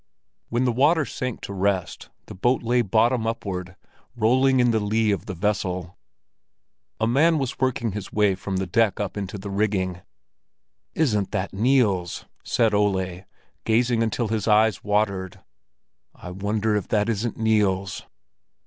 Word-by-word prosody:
When 120 +2 0
the 125 - +2
water 145 +6 +3
sank 125 -2 -5
to 100 - -6
rest, 95 -2 -2 0.2
the - - -10
boat 120 +8 +1
lay 120 +1 +2
bottom 115 +2 +2
upward, 95 -5 -4 0.4
rolling 130 +4 +3
in 120 -1 +4
the 110 - +1
lee 105 +1 +1
of 100 - -3
the 95 - -5
vessel. 95 -2 -2 1.0
A 110 - +2
man 155 +8 +3
was 135 -4 -3
working 120 -3 0
his 100 0 -6
way 105 -2 +3
from 95 0 -4
the 95 - -1
deck 105 +4 +1
up 100 -2 -3
into 100 0 -5
the 100 +1 -7
rigging. 95 -3 -1 0.9
"Isn't 105 -11 +1
that 95 +1 -2
Niels?" 105 -6 +1 0.2
said 115 -3 +1
Ole, 95 -3 0 0.4
gazing 115 +1 +2
until 115 0 -1
his 110 -2 -2
eyes 110 -2 +3
watered. 100 -3 -1 0.8
"I 90 - -9
wonder 105 +3 -1
if 105 - -2
that 105 0 +1
isn't 115 0 -2
Niels?" 100 -4 +1
105 Hz, 150 wpm, -24 LUFS, 95-115 Hz, 1.0 s, in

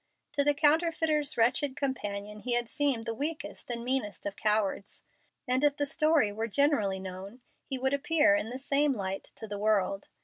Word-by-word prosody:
To 285 -1 +3
the 290 0 +3
counterfeiter's 310 -1 +2
wretched 255 +4 +2
companion 210 -6 -4
he 245 +3 -2
had 240 0 +1
seemed 270 -4 0
the 230 - -2
weakest 300 +5 -5
and 235 -1 -3
meanest 245 -6 -2
of 200 - -3
cowards, 210 -2 -1 0.4
and 255 +2 +2
if 290 0 +3
the 290 - 0
story 305 -6 +2
were 220 +2 -3
generally 220 -6 +1
known 190 +5 -8 0.3
he 265 - +1
would 265 +1 0
appear 310 +1 +3
in 300 -8 0
the 250 - -5
same 280 +1 +2
light 195 -4 -4
to 220 - -8
the 205 -1 -5
world. 200 -2 0
250 Hz, 180 wpm, -29 LUFS, 210-290 Hz, 0.4 s, To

